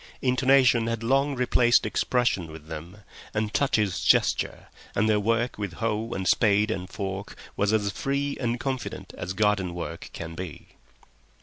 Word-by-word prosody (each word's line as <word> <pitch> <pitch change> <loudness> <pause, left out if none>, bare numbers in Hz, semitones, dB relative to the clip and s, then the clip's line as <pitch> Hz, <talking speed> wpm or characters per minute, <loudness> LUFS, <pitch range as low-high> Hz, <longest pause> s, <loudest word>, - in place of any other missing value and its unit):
Intonation 130 -2 +4
had 115 -1 -2
long 135 +4 +2
replaced 125 -1 +3
expression 115 -10 0
with 80 -1 -11
them, 85 +6 -9 0.3
and 105 0 -1
touches 105 -9 +1
gesture, - - +2 0.3
and 105 - +2
their 105 -1 +3
work 115 +2 0
with 100 -4 -3
hoe 110 +3 -2
and 95 -1 -2
spade 105 0 +3
and 90 -3 -4
fork 100 -1 -5 0.2
was 100 +1 +1
as 105 -2 +1
free 140 +6 -1
and 120 -1 -1
confident 130 -1 -4
as 90 +2 -4
garden 100 -3 +1
work 85 -1 -6
can 85 0 -7
be. 90 -2 -8
105 Hz, 150 wpm, -26 LUFS, 95-120 Hz, 0.3 s, Intonation